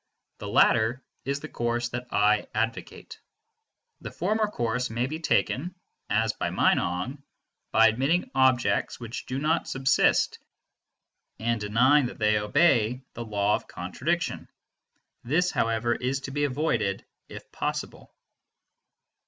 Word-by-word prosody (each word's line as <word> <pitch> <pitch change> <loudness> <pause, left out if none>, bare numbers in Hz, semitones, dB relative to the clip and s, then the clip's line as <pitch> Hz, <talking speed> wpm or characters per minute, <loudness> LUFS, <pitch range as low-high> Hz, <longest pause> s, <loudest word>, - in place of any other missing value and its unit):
The - - -6
latter 115 +4 +3 0.2
is 140 +1 -2
the - - -6
course 120 0 -2
that 120 +1 -5
I 105 +1 +2
advocate. 115 +1 -4 0.8
The - - -7
former 215 0 0
course 125 - -2
may 115 +2 -1
be 155 +4 -5
taken, 170 +1 0 0.3
as - - +1
by - - -3
Meinong, 90 +11 0 0.5
by 115 +1 +6
admitting 135 +9 0
objects 130 -2 +2
which 115 -1 -7
do 130 - -3
not 155 +4 0
subsist, 135 0 +2 1.0
and 115 0 -1
denying 125 +7 +3
that - - -9
they 105 -1 +2
obey 125 +1 +2
the 120 - -6
law 105 -2 0
of - - -2
contradiction; - - -3 0.7
this, 175 +8 +1
however, 115 +1 0
is 130 +3 -2
to 135 - -6
be 145 +1 0
avoided 125 -8 -1 0.2
if - - -11
possible. - - -4
120 Hz, 130 wpm, -26 LUFS, 110-140 Hz, 1.0 s, by